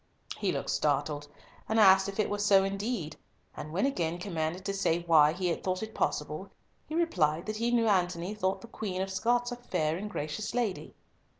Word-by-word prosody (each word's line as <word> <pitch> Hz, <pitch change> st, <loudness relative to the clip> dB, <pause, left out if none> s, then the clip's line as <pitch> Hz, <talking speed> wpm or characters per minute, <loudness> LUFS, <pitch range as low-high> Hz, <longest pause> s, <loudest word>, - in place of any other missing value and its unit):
He -, -, 0 dB
looked -, -, -2 dB
startled, 145 Hz, 0 st, 0 dB, 0.4 s
and 220 Hz, +1 st, +2 dB
asked 190 Hz, -1 st, +6 dB
if 195 Hz, -, -7 dB
it 215 Hz, -, +2 dB
were 205 Hz, -, -3 dB
so 200 Hz, -2 st, +5 dB
indeed, 195 Hz, -3 st, -3 dB, 0.4 s
and 155 Hz, -, -7 dB
when 185 Hz, +9 st, +1 dB
again 175 Hz, -11 st, -1 dB
commanded 175 Hz, -1 st, -3 dB
to 200 Hz, -, -1 dB
say 175 Hz, -3 st, 0 dB
why 155 Hz, -3 st, +6 dB
he 180 Hz, +2 st, -1 dB
had 170 Hz, -, -2 dB
thought 185 Hz, +1 st, -1 dB
it 220 Hz, 0 st, -7 dB
possible, -, -, -2 dB, 0.4 s
he 310 Hz, -, -5 dB
replied 175 Hz, -, +1 dB
that 215 Hz, 0 st, -3 dB
he 230 Hz, +2 st, 0 dB
knew 235 Hz, -1 st, +3 dB
Antony 180 Hz, -1 st, +1 dB
thought 190 Hz, -3 st, -1 dB
the 230 Hz, -, -10 dB
Queen 190 Hz, -5 st, -3 dB
of 195 Hz, -, -5 dB
Scots 240 Hz, +5 st, +1 dB
a -, -, -3 dB
fair 165 Hz, -10 st, -1 dB
and 210 Hz, +3 st, -5 dB
gracious 155 Hz, +5 st, -4 dB
lady. 230 Hz, -6 st, -2 dB
190 Hz, 200 wpm, -30 LUFS, 170-215 Hz, 0.4 s, asked